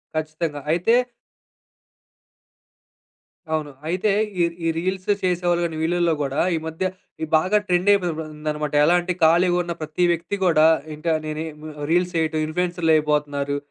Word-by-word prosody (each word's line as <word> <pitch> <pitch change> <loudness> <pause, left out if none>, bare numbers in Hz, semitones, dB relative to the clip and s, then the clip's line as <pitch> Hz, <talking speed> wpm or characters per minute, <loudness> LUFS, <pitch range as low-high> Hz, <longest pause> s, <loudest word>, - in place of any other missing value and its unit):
ఖచ్చితంగా. 155 -1 -3
అయితే 180 +7 +2 2.6
అవును. 150 -2 -2 0.2
అయితే 185 +4 +1 0.3
ఈ - - +5 0.2
ఈ - - +2
రీల్స్ 185 +2 -2 0.2
చేసేవాళ్ళు 175 -1 +1
గానీ, 165 -2 -4
వీళ్లల్లో 170 0 +1
గూడా, 140 +1 -2 0.2
ఈ - - 0
మధ్య 160 +4 -3 0.4
ఈ - - +1
బాగా 185 +6 +2
ట్రెండయిపోయిందన్నమాట. 160 -5 0
ఎలా 175 - +4
అంటే 180 +1 -2
ఖాళీగున్న 175 +1 +3
ప్రతి 155 +3 -2
వ్యక్తి 170 +4 -2
గూడా, 160 -3 +5 0.3
ఇంక 155 +3 -9 0.2
నేనె 155 +1 -4
ఈ - - -16 0.4
రీల్స్ 180 +1 +2
చెయ్యటం 155 -1 0
ఇన్‌ఫ్లూయెసర్‌లయిపోతున్నారు. 150 -4 0
165 Hz, 125 wpm, -22 LUFS, 155-180 Hz, 2.6 s, ఈ